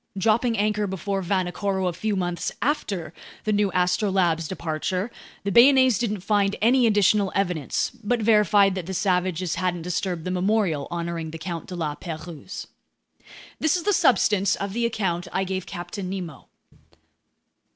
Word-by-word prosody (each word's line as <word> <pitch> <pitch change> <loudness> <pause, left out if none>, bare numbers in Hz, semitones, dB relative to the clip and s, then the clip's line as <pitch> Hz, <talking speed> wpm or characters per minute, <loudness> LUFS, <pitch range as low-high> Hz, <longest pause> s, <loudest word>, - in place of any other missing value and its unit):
Dropping 225 +4 +2
anchor 210 0 +1
before 195 +1 -2
Vanikoro 190 +1 -1
a 180 - -1
few 205 +5 -2
months 175 -2 -2
after 200 - -2 0.3
the 215 - 0
new 205 -1 +2
Astrolabe's 180 -3 +1
departure, 180 +5 -3 0.3
the 200 - -1
Bayonnaise 260 +1 +6
didn't 210 -5 -2
find 200 0 +1
any 240 +2 +4
additional 205 -2 +3
evidence 180 -7 -1
but 240 +3 +1
verified 210 -3 +4
that 185 -3 -5
the 190 - -4
savages 180 -2 0
hadn't 175 -2 -1
disturbed 180 -1 -2
the 185 - -2
memorial 185 -5 +1
honoring 170 -1 -4
the 165 - -7
Count 165 0 -6
de 185 - -6
La 160 -4 -2
Pérouse. 160 +1 -7 0.9
This 315 +3 +2
is 345 - -5
the 415 - +2
substance 210 - +3
of 200 0 -4
the 235 +1 +1
account 185 -6 -2
I 190 - 0
gave 190 -1 -4
Captain 180 +2 -6
Nemo. 180 -5 -6
190 Hz, 150 wpm, -24 LUFS, 175-210 Hz, 0.9 s, Bayonnaise